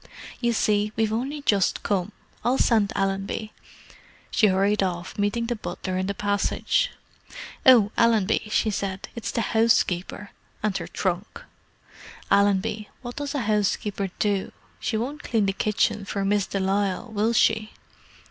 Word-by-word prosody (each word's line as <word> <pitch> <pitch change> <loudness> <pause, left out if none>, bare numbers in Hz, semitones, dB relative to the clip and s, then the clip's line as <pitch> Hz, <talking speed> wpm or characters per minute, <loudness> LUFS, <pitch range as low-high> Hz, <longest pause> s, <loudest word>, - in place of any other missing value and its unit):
"You 240 -1 +1
see, 210 -2 +1
we've 220 -1 +1
only 275 +6 -3
just 200 -7 +2
come. 195 0 0 0.3
I'll 250 +2 +2
send 220 -5 +3
Allenby." 195 +2 -2 0.8
She 215 - +4
hurried 200 +2 +2
off, 175 -2 -2
meeting 205 +3 0
the 240 +1 -1
butler 190 -3 -5
in 185 - -1
the 200 - -2
passage. 205 - +1 0.8
"Oh, 230 -5 +7
Allenby," 225 -2 +2
she 215 0 +1
said; 195 -1 -4
"it's 230 -3 -4
the 230 - -1
housekeeper. 210 -3 +1 0.3
And 210 -3 0
her - - -6
trunk. 185 +1 -3 0.9
Allenby, 205 +1 +2
what 240 0 -7
does 290 0 -3
a 280 - 0
housekeeper 210 -2 0
do? 200 -2 0 0.3
She 220 - -1
won't 275 +7 -4
clean 220 -4 +1
the 195 - 0
kitchen 210 0 0
for 195 0 -3
Miss 200 -1 +1
de 195 - -2
Lisle, 195 +3 -1
will 215 +2 +1
she?" 220 -1 +2
210 Hz, 150 wpm, -25 LUFS, 195-225 Hz, 0.9 s, Oh